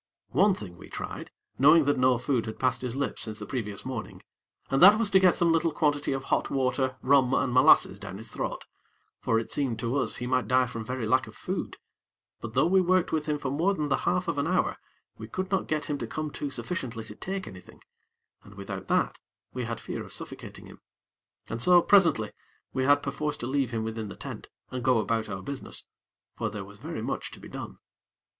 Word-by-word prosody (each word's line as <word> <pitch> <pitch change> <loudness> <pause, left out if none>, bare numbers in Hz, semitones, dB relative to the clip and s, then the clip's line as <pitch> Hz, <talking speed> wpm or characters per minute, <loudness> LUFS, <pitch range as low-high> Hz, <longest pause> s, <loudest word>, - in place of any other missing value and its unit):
One 200 -1 +4
thing 90 - -9
we - - -12
tried, - - -6 0.3
knowing 150 +4 +7
that 145 0 +2
no 130 -1 +4
food 125 -2 0
had 110 - -5
passed 125 -1 +1
his 125 -1 -3
lips 140 -1 -2
since 110 -2 -3
the - - -6
previous 105 -6 -4
morning, 130 -4 -6 0.5
and 135 - +2
that 200 +4 +10
was 220 -2 0
to 190 - +6
get 185 -2 +5
some 170 -1 +3
little 165 0 +2
quantity 145 -2 +1
of 135 0 -2
hot - - 0
water, 130 0 0
rum 135 -1 +4
and 125 - +1
molasses 130 0 +5
down 95 - -7
his 110 +1 -9
throat; - - -4 0.5
for 115 - +1
it 115 - -3
seemed 130 -6 0
to 120 +2 -2
us - - 0
he 125 - -4
might 130 0 +1
die 130 0 +4
from 115 -2 -6
very 125 +1 -3
lack 130 +3 +2
of - - -12
food; - - -4 0.6
but 110 -1 -7
though - - +4
we 190 +2 +4
worked 185 0 +2
with 155 -1 -1
him 150 -1 +1
for 135 -2 -3
more 175 +8 +1
than 150 -4 -2
the - - +3
half 180 +1 0
of 145 - -1
an 140 - 0
hour, 180 +1 +1 0.4
we - - -7
could 185 +1 -4
not 195 - +1
get 155 -1 -1
him 145 -2 -3
to - - -4
come 155 -1 -4
to 145 - -4
sufficiently 130 -7 -4
to 105 - -10
take 190 - -5
anything, 90 -1 -12 0.6
and - - -15
without - - -6
that - - +1 0.3
we 125 -2 -3
had 115 -1 -4
fear - - -5
of - - -12
suffocating - - -8
him. - - -14 0.7
And 115 +1 -4
so, 180 +5 +7
presently, 170 - +4 0.4
we 130 0 0
had 145 +1 +4
perforce 145 +2 -2
to - - -5
leave 135 -1 0
him 115 -2 -2
within 110 -1 -4
the 100 - -8
tent, - - -8 0.2
and 125 -1 -4
go 125 0 +4
about 110 0 0
our 95 -1 -5
business; 140 -1 -6 0.5
for 115 - -1
there 105 -2 -6
was 100 +1 -14
very 155 -3 -5
much - - -3
to - - -10
be - - -11
done. - - -7
130 Hz, 225 wpm, -28 LUFS, 115-155 Hz, 0.7 s, that